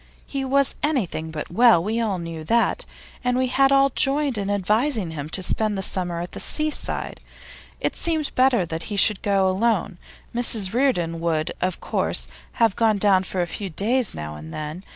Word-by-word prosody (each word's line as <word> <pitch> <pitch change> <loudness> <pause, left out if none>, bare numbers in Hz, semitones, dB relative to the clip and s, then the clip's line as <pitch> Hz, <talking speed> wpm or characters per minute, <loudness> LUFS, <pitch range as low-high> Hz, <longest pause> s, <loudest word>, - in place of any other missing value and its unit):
He 275 -1 -4
was 275 +1 +1
anything 220 - -1
but 155 0 -6
well; 230 -3 +5
we 220 +4 -1
all 210 -5 -1
knew 165 -2 -7
that, 230 +6 +1 0.4
and 250 0 0
we 260 - +2
had 270 +2 +2
all 275 0 +4
joined 275 0 +2
in 200 -1 -2
advising 210 - 0
him 150 -1 -6
to 185 +3 -1
spend 215 +2 0
the 195 - -2
summer 175 -3 -1
at 175 - -7
the - - -8
seaside. 305 0 0 0.6
It - - -2
seemed 320 -3 0
better 255 -7 +3
that 165 0 -5
he 205 - -4
should 205 -1 +3
go 195 -2 +2
alone; 190 -2 0 0.3
Mrs 225 -5 +1
Reardon 180 -11 0
would, 160 -2 -1
of 185 -1 -1
course, - - 0 0.3
have 225 -4 +2
gone 220 -2 +2
down 195 -2 +3
for 185 -1 -2
a - - -2
few 195 +3 -5
days 225 +7 +2
now 75 0 -6
and 75 +1 -10
then. 155 - -6
205 Hz, 190 wpm, -23 LUFS, 175-250 Hz, 0.6 s, well